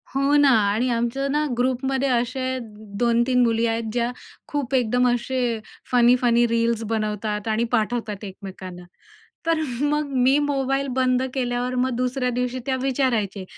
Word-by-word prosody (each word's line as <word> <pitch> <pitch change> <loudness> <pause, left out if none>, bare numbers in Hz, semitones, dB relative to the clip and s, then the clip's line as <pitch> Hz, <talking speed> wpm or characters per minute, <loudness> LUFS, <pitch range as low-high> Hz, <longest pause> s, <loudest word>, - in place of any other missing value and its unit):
हो 275 +2 +2
ना 285 -1 +5 0.2
आणि 240 +4 0
आमचं 240 +4 -1
ना 300 +1 +1
ग्रुपमध्ये 260 +2 0
असे 255 +2 -1 0.4
2-3 240 +1 +2
मुली 230 0 +2
आहेत 225 0 -1
ज्या 240 0 0 0.4
खूप 280 -3 -3
एकदम 250 0 +2
असे 245 -1 -1 0.3
फनी-फनी 240 -1 +4
रील्स 230 0 0
बनवतात 215 -1 -2
आणि 220 +1 +1
पाठवतात 220 -2 -1
एकमेकांना. 185 -2 -9 0.6
तर 330 -1 +2 0.2
मग 295 0 0
मी 270 +3 +4
मोबाईल 275 -1 0
बंद 255 -1 +2
केल्यावर 250 -1 -1
मग 255 +1 +1
दुसऱ्या 250 +1 -1
दिवशी 250 +1 -2
त्या 265 -1 0
विचारायचे. 240 -8 0
245 Hz, 135 wpm, -23 LUFS, 230-265 Hz, 0.6 s, ना